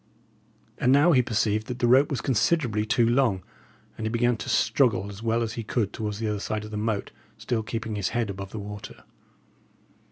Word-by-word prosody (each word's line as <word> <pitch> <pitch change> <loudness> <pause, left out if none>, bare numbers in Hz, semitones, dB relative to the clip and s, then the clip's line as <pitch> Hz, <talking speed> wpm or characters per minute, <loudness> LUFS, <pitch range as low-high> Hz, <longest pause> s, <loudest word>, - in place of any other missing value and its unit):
And 125 - +3
now 145 +6 +6
he 130 -5 +5
perceived 110 -2 0
that 125 - -4
the 125 - +1
rope 130 +4 +5
was 135 -4 -2
considerably 120 -4 +1
too 115 +1 +3
long, 120 -7 +2 0.6
and 110 - -2
he - - -1
began 120 +1 +2
to - - -6
struggle 110 -2 +2
as 100 +2 -10
well 115 +1 +1
as 115 -1 -3
he 115 - -4
could 110 -2 -1
towards 105 -2 -3
the 110 0 -2
other 105 -1 -1
side 105 +1 -3
of 105 - -10
the - - -5
moat, 105 -1 -2 0.3
still 120 -2 -1
keeping 115 0 -4
his 100 -3 -1
head 115 -4 -1
above 100 +2 -8
water. 105 -1 -8
110 Hz, 200 wpm, -26 LUFS, 105-120 Hz, 0.6 s, now